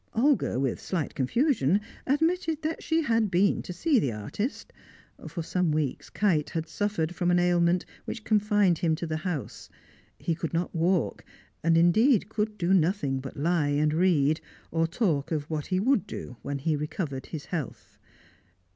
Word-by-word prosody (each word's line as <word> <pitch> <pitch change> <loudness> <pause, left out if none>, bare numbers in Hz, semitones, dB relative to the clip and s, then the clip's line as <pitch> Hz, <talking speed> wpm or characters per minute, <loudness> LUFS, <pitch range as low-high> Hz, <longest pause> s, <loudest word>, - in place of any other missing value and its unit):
Olga, 255 - +2
with 135 -2 -1
slight 170 -6 -2
confusion, 200 - +2 0.3
admitted 320 +2 +1
that 315 +1 -2
she 325 0 +1
had 225 -5 +2
been 190 +2 +2
to - - -7
see 265 - +2
the 135 - 0
artist. 110 - -4 0.5
For 170 - -5
some 180 0 0
weeks 150 -3 -2
Kite 170 -8 +1
had 160 0 -3
suffered 180 -5 -1
from 175 0 0
an 175 - +4
ailment 175 0 +2 0.2
which 225 - -5
confined 210 -5 +3
him 160 -2 +2
to 170 - -4
the 160 -1 -2
house; 160 -4 -5 0.5
he 170 - -1
could 165 0 -4
not 170 +1 -1
walk, 175 +1 0 0.4
and 165 0 +4
indeed 205 +6 +4
could 215 -1 -2
do 180 0 +1
nothing 165 -6 +2
but 135 0 -8
lie 160 0 +1
and 150 +1 +2
read, 155 -3 +3 0.3
or 165 0 +1
talk 165 - 0
of 150 -2 -1
what 150 -2 -2
he 185 -1 +1
would 230 -1 +2
do, 125 - -7
when 140 0 -3
he 155 +3 0
recovered 150 -2 -4
his 155 -3 -6
health. 155 -8 -6
175 Hz, 170 wpm, -27 LUFS, 155-210 Hz, 0.5 s, an